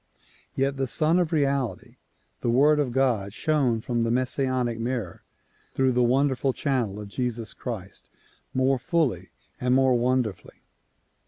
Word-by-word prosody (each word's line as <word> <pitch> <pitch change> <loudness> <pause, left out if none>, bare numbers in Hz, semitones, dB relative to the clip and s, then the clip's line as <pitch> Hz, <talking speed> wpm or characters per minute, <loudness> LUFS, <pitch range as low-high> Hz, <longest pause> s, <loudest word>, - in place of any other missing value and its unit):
Yet 135 +1 0
the 135 -1 -1
Sun 160 +7 +2
of 175 -2 0
Reality, 140 -5 -1 0.4
the 120 - -1
Word 145 +5 +4
of 140 -4 0
God 120 -6 0
shone 135 -8 +1
from 120 -1 -1
the 115 - 0
Messianic 130 -1 0
mirror 115 -6 -3 0.5
through 130 -1 +2
the 125 0 +2
wonderful 130 +2 +2
channel 120 -9 -1
of 105 - -7
Jesus 115 +1 -3
Christ 105 -6 -7 0.4
more 130 0 +1
fully 165 -3 0 0.3
and 125 0 +2
more 130 -1 +4
wonderfully. 120 -4 -1
130 Hz, 140 wpm, -25 LUFS, 120-135 Hz, 0.5 s, Word